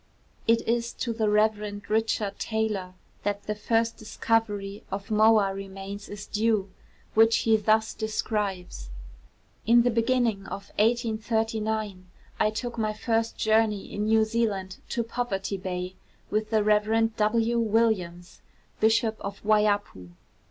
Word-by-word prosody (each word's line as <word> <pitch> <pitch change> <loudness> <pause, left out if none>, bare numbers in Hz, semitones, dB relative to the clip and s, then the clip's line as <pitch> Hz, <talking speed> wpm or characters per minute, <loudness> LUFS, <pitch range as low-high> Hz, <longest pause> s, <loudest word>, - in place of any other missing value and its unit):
It 230 0 +3
is 235 0 0
to 235 - -3
the 220 -2 0
Rev. 210 -1 +1
Richard 215 -2 0
Taylor 215 -5 -2 0.3
that 205 0 -2
the 210 - -2
first 225 +2 0
discovery 210 -2 -1
of 195 +2 -5
moa 215 -2 +4
remains 195 +1 -7
is 205 -1 -7
due, 210 -3 0 0.4
which 225 +1 +5
he 225 -1 +5
thus 220 +1 +2
describes: 200 - -3 0.8
'In 235 +1 +6
the 245 - +2
beginning 230 -3 +1
of 200 - -7
1839 220 -3 0 0.3
I 215 - +3
took 235 +2 -4
my 215 -1 0
first 225 +1 -1
journey 215 -2 +1
in 205 +1 -1
New 220 0 +4
Zealand 210 -4 -2
to 235 - -1
Poverty 215 -4 -3
Bay 180 -1 -4 0.4
with 215 +1 0
the 215 -1 +2
Rev. 220 +2 +2
W. 230 +2 +2
Williams 210 -6 0 0.4
(Bishop 220 0 +2
of 200 0 -7
Waiapu). 205 - +1
215 Hz, 130 wpm, -27 LUFS, 200-225 Hz, 0.8 s, In